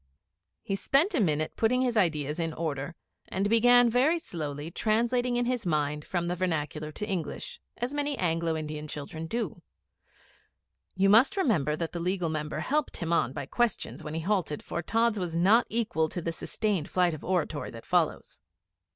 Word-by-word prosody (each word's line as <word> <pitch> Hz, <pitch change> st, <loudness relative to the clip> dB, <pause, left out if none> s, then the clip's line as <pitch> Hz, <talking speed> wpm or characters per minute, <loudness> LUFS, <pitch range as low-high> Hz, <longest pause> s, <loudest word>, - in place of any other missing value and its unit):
He 195 Hz, -, -1 dB
spent 290 Hz, -, +2 dB
a 310 Hz, -, +2 dB
minute 155 Hz, -6 st, 0 dB
putting 250 Hz, +3 st, +2 dB
his 245 Hz, -2 st, 0 dB
ideas 155 Hz, -6 st, +1 dB
in 165 Hz, -1 st, -1 dB
order, 155 Hz, -1 st, -3 dB, 0.3 s
and 195 Hz, +2 st, -1 dB
began 245 Hz, +2 st, +6 dB
very 260 Hz, +8 st, +3 dB
slowly, 155 Hz, -, -5 dB
translating 240 Hz, +5 st, +1 dB
in 245 Hz, 0 st, +1 dB
his 245 Hz, -1 st, -1 dB
mind 150 Hz, -3 st, -1 dB
from 175 Hz, -2 st, -1 dB
the 175 Hz, +1 st, -1 dB
vernacular 155 Hz, -4 st, -2 dB
to 210 Hz, -, -5 dB
English, 200 Hz, -, -4 dB, 0.2 s
as 245 Hz, +3 st, -2 dB
many 290 Hz, -1 st, -1 dB
Anglo 165 Hz, -2 st, 0 dB
Indian 155 Hz, -1 st, -5 dB
children 155 Hz, +2 st, -6 dB
do. 210 Hz, -5 st, -3 dB, 1.3 s
You 195 Hz, +1 st, +3 dB
must 235 Hz, -, +5 dB
remember 165 Hz, -, +2 dB
that 165 Hz, +1 st, -3 dB
the 170 Hz, -, -4 dB
Legal 180 Hz, 0 st, -1 dB
Member 155 Hz, -1 st, -3 dB
helped 300 Hz, +1 st, -1 dB
him 170 Hz, -1 st, -2 dB
on 125 Hz, -7 st, +2 dB
by 135 Hz, -, -5 dB
questions 240 Hz, -, -1 dB
when 150 Hz, +1 st, -5 dB
he 165 Hz, -, -2 dB
halted, 180 Hz, -5 st, -1 dB
for 170 Hz, -, -3 dB
Tods 225 Hz, +3 st, +1 dB
was 175 Hz, -3 st, -3 dB
not 200 Hz, +8 st, +4 dB
equal 210 Hz, -9 st, 0 dB
to 175 Hz, -, -4 dB
the 165 Hz, 0 st, -2 dB
sustained 195 Hz, 0 st, -2 dB
flight 180 Hz, -2 st, +2 dB
of 155 Hz, -, -7 dB
oratory 175 Hz, -4 st, -1 dB
that 115 Hz, -1 st, -10 dB
follows. -, -, 0 dB
180 Hz, 175 wpm, -28 LUFS, 155-230 Hz, 1.3 s, began